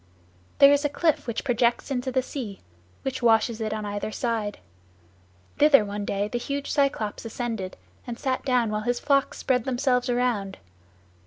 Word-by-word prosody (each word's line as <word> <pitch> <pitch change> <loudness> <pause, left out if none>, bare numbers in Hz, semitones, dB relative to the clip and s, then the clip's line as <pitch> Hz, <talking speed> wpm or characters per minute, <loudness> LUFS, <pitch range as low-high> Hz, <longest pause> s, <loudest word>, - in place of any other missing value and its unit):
"There 280 0 +8
is 285 +1 +2
a 290 - +1
cliff 310 -1 0
which 235 - -2
projects 245 +1 +1
into 260 0 -1
the 260 0 +1
sea, 235 -8 -6 0.4
which 265 -1 -3
washes 225 -1 +3
it 215 -1 -2
on 215 -1 -3
either 205 +1 -3
side. 220 -3 -2 1.0
Thither 285 -6 +6
one 205 0 -4
day 200 +1 -1
the 240 +3 -3
huge 280 +3 -3
Cyclops 275 -7 0
ascended, 225 -4 -4 0.3
and 235 -1 -5
sat 260 -1 -2
down 250 -4 +1
while 210 0 -1
his 245 +2 -1
flocks 280 -1 +1
spread 250 -3 +1
themselves 250 -1 +1
around. 240 -6 0
240 Hz, 165 wpm, -25 LUFS, 215-265 Hz, 1.0 s, There